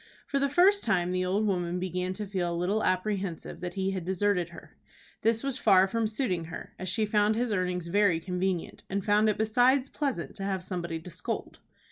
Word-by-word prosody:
For 280 - 0
the 280 0 +1
first 380 +7 +4
time 180 -1 +1
the 185 0 0
old 200 +4 +1
woman 180 -3 0
began 180 0 -2
to 210 +2 -5
feel 185 -3 -2
a 170 - -2
little 195 +5 0
apprehensive 185 -2 -1
that 175 0 -5
he 190 0 0
had 190 -2 -3
deserted 185 -1 0
her. 170 - -13 0.5
This 225 +1 +2
was 275 -2 -2
far 190 -3 +5
from 225 +2 0
suiting 210 -7 -1
her, 165 0 -8
as 185 - -3
she 215 +3 +1
found 210 0 +2
his 240 0 0
earnings 180 -3 -1
very 185 -1 +3
convenient, 180 0 -2
and 195 0 -2
found 210 +1 +4
it 210 - 0
besides 250 +5 +3
pleasant 270 - -3
to 195 - -5
have 190 -2 -2
somebody 175 -3 -4
to 165 - -10
scold. 170 - -5
190 Hz, 205 wpm, -29 LUFS, 180-215 Hz, 0.5 s, far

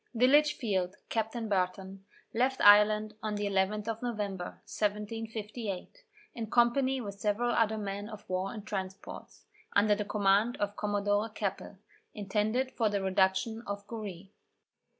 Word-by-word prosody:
The 240 +2 +4
Litchfield, 240 -10 +3
Captain 225 +1 -2
Barton, 190 0 -2 0.3
left 260 +3 +1
Ireland 210 +1 +6
on 215 -1 -2
the 205 0 -2
11th 200 +2 0
of 225 -1 -3
November, 205 -7 -4
1758, 215 - -4 0.3
in 225 -2 -5
company 260 +3 +3
with 200 -4 -6
several 220 +4 +1
other 220 -2 +2
men 205 0 -4
of 215 -1 -10
war 185 +1 -1
and 215 -3 -8
transports, 190 -2 -6 0.3
under 210 +1 +5
the 210 0 -1
command 205 +3 +2
of 205 0 -2
Commodore 205 +1 0
Keppel, 200 -1 -4 0.4
intended 215 +6 0
for 225 -3 +1
the 200 -1 -1
reduction 190 +4 +1
of 200 0 -4
Goree. 200 -4 -7
210 Hz, 135 wpm, -31 LUFS, 200-225 Hz, 0.4 s, Ireland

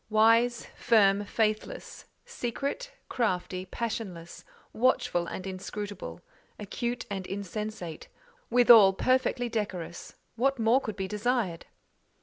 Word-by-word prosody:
Wise, 230 +2 +4
firm, 205 -4 +3
faithless; 215 0 -2 0.2
secret, 380 - -4 0.2
crafty, 185 -4 -2
passionless; 195 -6 -5 0.3
watchful 220 -7 +1
and 185 - -6
inscrutable; 190 - -6 0.4
acute 235 +3 -4
and 190 -2 -4
insensate—withal 215 - +2
perfectly 255 +2 +1
decorous—what 220 +5 -3
more 230 +3 +3
could 215 -5 -5
be 190 -1 -3
desired? 210 -4 -1
215 Hz, 90 wpm, -28 LUFS, 190-240 Hz, 0.4 s, Wise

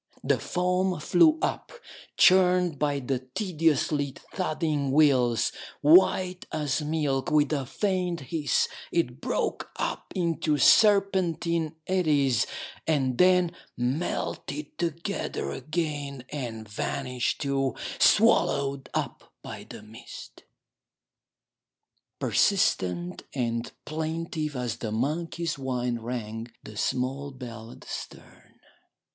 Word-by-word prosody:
The - - +2
foam 180 0 0
flew 315 - +4
up, - - -2 0.5
churned 180 -4 +5
by 145 -1 +1
the 130 0 -1 0.2
tediously 155 -7 +1 0.2
thudding 155 -6 -1
wheels; 125 -6 +4 0.3
white 180 +3 +4
as 150 -1 -1
milk, 150 -3 -1
with 150 0 +3
a 140 -4 -2
faint 180 - -1
hiss 150 +2 0 0.2
it 130 -8 -1
broke - - -2
up - - -3
into 165 -4 0
serpentine 175 -4 +3
eddies, 150 -9 +2 0.4
and 135 -5 +1
then 180 -1 +5 0.3
melted 160 - -3
together 165 - -3
again 145 - -3
and 115 -6 -5
vanished 125 +4 -2
too, 135 -3 0 0.2
swallowed 140 -1 +3
up - - -4
by - - -8
the - - -9
mist. 110 +2 -12 1.7
Persistent 90 -1 +1
and 115 -2 -2
plaintive 160 -1 -3
as 125 -2 -2
the 110 - -4
monkey's 155 +6 -2
whine 125 -2 -2
rang 115 -1 -5 0.2
the 105 - -10
small 130 +5 -1
bell 120 -4 -9
at - - -13
the - - -15
stern. - - -9
145 Hz, 105 wpm, -27 LUFS, 125-170 Hz, 1.7 s, churned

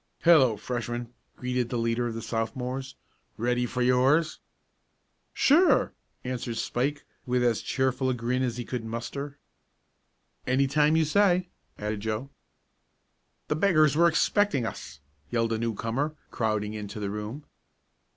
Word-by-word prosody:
"Hello, 135 -10 +6
Freshmen!" 120 +1 -4 0.2
greeted 125 -1 -2
the 120 - -2
leader 115 +1 0
of 115 - -4
the 115 - -5
Sophomores. 125 +4 -3 0.4
"Ready 125 +2 0
for 125 +1 -1
yours?" 135 +6 +3 0.9
"Sure," 335 +6 +4 0.3
answered 125 -2 -4
Spike 140 +6 -1 0.2
with 125 0 +1
as 120 -2 +2
cheerful 130 0 0
a 130 - 0
grin 125 +2 -1
as 125 -2 -1
he 120 - -4
could 125 -3 -4
muster. 120 +5 -5 1.1
"Any 130 +2 +3
time 150 +3 +3
you 160 0 +3
say," 180 +1 +3 0.3
added 105 0 -3
Joe. 110 +6 -3 1.2
"The 150 - 0
beggars 155 -4 +4
were 170 +2 +5
expecting 170 - +2
us!" 70 - -7 0.3
yelled 115 -1 0
a 110 - -1
newcomer, 115 +6 -2 0.2
crowding 110 -2 -1
into 105 -1 -6
the 100 -1 -3
room. 105 +8 -6
125 Hz, 135 wpm, -27 LUFS, 115-140 Hz, 1.2 s, Hello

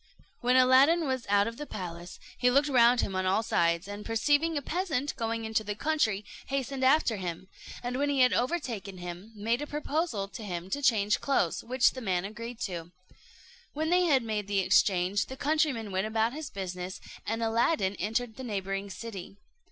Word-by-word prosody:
When 250 +1 +2
Aladdin 265 +6 +6
was 260 -3 -2
out 200 0 +4
of 230 0 -5
the 295 - -6
palace, 175 -2 -7 0.2
he 250 - +3
looked 280 +4 +3
round 245 -2 +5
him 195 - -3
on 185 0 0
all 195 +4 +2
sides, 170 -2 +1
and 205 +1 -7
perceiving 290 +8 +1
a - - -1
peasant 310 -5 -2
going 230 -2 -2
into 220 0 0
the 210 0 -4
country, 220 -8 0 0.2
hastened 275 0 -2
after 260 -4 +4
him; 180 -1 -5 0.4
and 250 +2 -2
when 285 0 +1
he 275 -2 +2
had 250 - +5
overtaken 240 - -2
him, 180 +4 -8
made 230 +5 -1
a 295 - -4
proposal 295 - -2
to 220 +3 -9
him 180 -2 -5
to 285 - -1
change 210 -6 +2
clothes, 270 -12 0
which 255 +2 +3
the 260 - -8
man 185 -4 0
agreed 230 +3 -7
to. 175 -3 -4 0.8
When 315 +3 -1
they 360 0 +4
had 275 -7 +3
made 215 -3 -3
the 200 -1 -1
exchange, 185 +1 +2
the 265 - -8
countryman 285 -8 0
went 190 +3 0
about 220 +2 +1
his 305 -1 -6
business, 185 -1 -5 0.3
and 225 +2 -1
Aladdin 225 -2 +2
entered 220 +4 -2
the 260 - -6
neighbouring 195 -3 -3
city. 195 -2 -8
225 Hz, 190 wpm, -29 LUFS, 195-270 Hz, 0.8 s, Aladdin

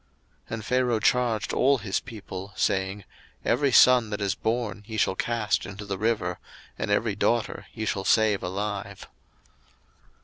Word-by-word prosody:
02:001:022 - - -8
And 110 -1 -7
Pharaoh 125 -3 +1
charged 120 -1 +1
all 140 +2 +4
his 100 -5 -2
people, 100 -3 -8
saying, 95 +1 0 0.4
Every 130 +4 +2
son 125 -2 +6
that 105 0 -3
is 100 -1 0
born 110 0 -2
ye 110 -1 -5
shall 95 - +2
cast 110 +1 0
into 100 +2 -8
the 100 -1 -4
river, 100 -5 0 0.4
and - - -4
every - - +1
daughter - - 0
ye 110 - -4
shall 100 -2 -1
save 105 0 +3
alive. 100 +1 -4
105 Hz, 150 wpm, -26 LUFS, 100-115 Hz, 0.4 s, son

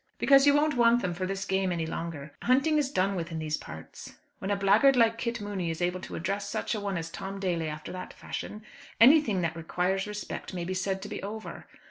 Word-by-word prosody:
"Because 275 0 +6
you 285 - +6
won't 300 0 +2
want 240 0 +4
them 180 - -1
for 185 +1 -3
this 195 0 -3
game 190 -1 0
any 170 -2 -1
longer. 160 -3 -5
Hunting 275 +5 +3
is 280 -3 0
done 195 -6 +1
with 170 -1 -4
in 165 - -4
these 155 -1 -1
parts. 80 - -10 0.2
When 190 - -4
a 205 - +2
blackguard 205 +8 +5
like 230 -1 +3
Kit 240 0 -2
Mooney 200 -4 -3
is 165 - -3
able 180 +1 0
to - - -8
address 200 +4 -2
such - - -2
a 215 - -2
one 200 -2 -2
as 165 0 -5
Tom 195 +1 -6
Daly 175 -4 -1
after 150 0 -7
that 185 0 -7
fashion, 210 +1 -7 0.4
anything 240 - +6
that 165 -2 -1
requires 180 +4 -1
respect 210 -2 -6
may 175 -1 -3
be 185 - -2
said 190 +1 -2
to - - -6
be - - -5
over. 215 +2 -7
195 Hz, 230 wpm, -28 LUFS, 175-225 Hz, 0.4 s, Because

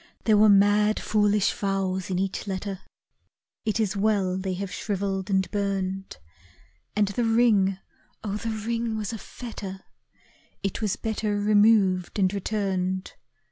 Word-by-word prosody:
There 220 - +4
were 210 +1 +6
mad 205 +1 +4
foolish 210 -1 +2
vows 195 -2 -2
in 185 - -1
each 195 +2 -2
letter, 190 0 -4 0.9
It 220 +1 0
is 210 -2 0
well 200 -3 +1
they 190 0 -2
have 195 0 -5
shrivelled 195 -1 -2
and 190 -1 +2
burned, 195 - -2 0.8
And 205 -1 +2
the 220 +4 -1
ring! 225 -5 +3 0.5
oh, 205 -1 -2
the 225 +2 -4
ring 225 +1 -2
was 215 +1 -3
a 225 - -5
fetter, 195 -6 -8 0.8
It 195 +3 -2
was 210 -3 0
better 215 -2 -2
removed 205 -3 +3
and 190 -1 +2
returned. 190 -2 -2
200 Hz, 140 wpm, -26 LUFS, 190-215 Hz, 0.9 s, were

